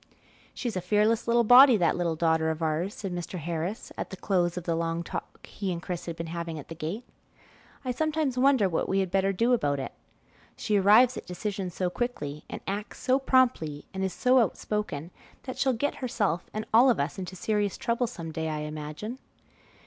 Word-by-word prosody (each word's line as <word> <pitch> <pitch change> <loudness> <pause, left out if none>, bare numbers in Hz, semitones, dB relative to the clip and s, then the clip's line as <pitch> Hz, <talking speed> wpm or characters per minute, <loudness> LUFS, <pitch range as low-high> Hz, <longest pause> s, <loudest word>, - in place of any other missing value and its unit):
"She's 240 -5 -3
a 185 - -1
fearless 210 +5 +2
little 235 0 +4
body, 245 +1 +8
that 175 -4 +2
little 170 -2 0
daughter 160 0 +2
of 160 +1 -3
ours," 160 +5 -1
said 195 -3 -5
Mr. 175 +1 -5
Harris 170 +5 -4
at - - -3
the 190 - -8
close 180 -2 0
of 180 - -3
the 170 - -1
long 165 0 -1
talk - - -7
he 195 -2 -4
and 170 - -3
Chris 175 0 -5
had 170 - -4
been 165 0 -5
having 170 -1 -4
at 145 - -9
the - - -5
gate. 165 +9 -5 0.8
"I 255 - 0
sometimes 310 -1 0
wonder 255 -5 +4
what 170 - -1
we 195 - +1
had 190 -2 -1
better 195 0 +2
do 230 +6 +2
about 145 - +1
it. 135 - -5 0.6
She 210 - 0
arrives 215 +6 +6
at - - -8
decisions 185 0 -4
so 180 -1 -1
quickly 150 -12 -4
and - - -6
acts 205 +2 -4
so 260 +1 +2
promptly 245 - +2
and 190 0 -3
is 190 - 0
so 255 +8 +3
outspoken, 210 -8 -2 0.3
that 255 - -7
she'll 265 - +3
get 260 +4 -1
herself 205 -8 -1
and 215 0 -4
all 245 +4 +7
of 240 - +2
us 145 +5 -2
into 185 0 -6
serious 205 0 -1
trouble 235 +1 0
some 170 -8 -7
day, 160 0 -3
I 155 -1 -3
imagine." 150 - -6
190 Hz, 205 wpm, -28 LUFS, 165-235 Hz, 0.8 s, body